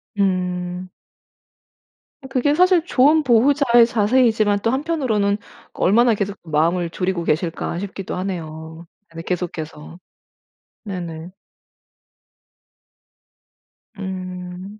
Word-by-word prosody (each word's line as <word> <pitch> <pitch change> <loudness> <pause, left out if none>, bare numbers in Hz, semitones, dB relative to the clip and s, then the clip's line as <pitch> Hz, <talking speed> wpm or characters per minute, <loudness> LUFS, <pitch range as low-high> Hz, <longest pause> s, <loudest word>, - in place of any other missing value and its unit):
음. 180 -2 -1 1.4
그게 280 +3 +1
사실 365 -1 +4
좋은 300 +2 +4
보호자의 240 -1 +4
자세이지만 220 -2 +2
또 230 - +2
한편으로는 260 -9 0 0.4
그 - - -10
얼마나 230 +4 +4
계속 200 0 -3
마음을 170 +2 0
졸이고 180 0 -2
계실까 170 +1 -1
싶기도 195 -1 -5
하네요. 160 -3 -6 0.2
아니 165 0 -9
계속해서. 165 -2 -5 0.9
네네. 175 -4 -6 2.7
음. 185 +1 -7
190 Hz, 210 characters per minute, -21 LUFS, 175-235 Hz, 2.7 s, 사실